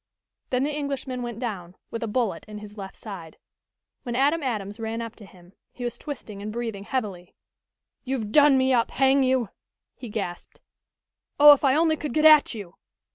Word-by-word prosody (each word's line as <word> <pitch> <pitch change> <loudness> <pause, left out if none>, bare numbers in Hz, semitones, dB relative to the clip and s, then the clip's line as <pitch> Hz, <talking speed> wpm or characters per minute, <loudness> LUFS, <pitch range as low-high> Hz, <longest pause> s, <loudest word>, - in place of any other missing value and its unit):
Then 255 0 +1
the 295 +1 -1
Englishman 275 -3 -3
went 240 -2 -5
down, 195 -8 -5 0.2
with 230 - -4
a 230 - -2
bullet 210 -5 -1
in 210 0 -8
his 210 0 -10
left 195 -2 -8
side. 180 -7 -9 0.6
When 240 -3 -5
Adam 290 +6 +2
Adams 210 -6 -3
ran 225 0 -3
up 230 -1 -6
to 205 - -13
him 180 0 -19 0.2
he 250 - -9
was 240 - -4
twisting 225 -9 -7
and 210 +1 -5
breathing 225 -3 -5
heavily. 200 -9 -4 0.7
"You've 250 -6 -3
done 290 +1 +6
me 260 0 +3
up, 235 -2 +2
hang 270 +1 +3
you!" 255 -4 +1 0.5
he 245 - -9
gasped. 195 -5 -6 0.8
"Oh, 295 0 +11
if 285 - -2
I 270 -1 +4
only 315 0 +3
could 295 -4 -5
get 310 0 +3
at 305 -5 +7
you!" 195 -5 -9
235 Hz, 185 wpm, -25 LUFS, 205-270 Hz, 0.8 s, Oh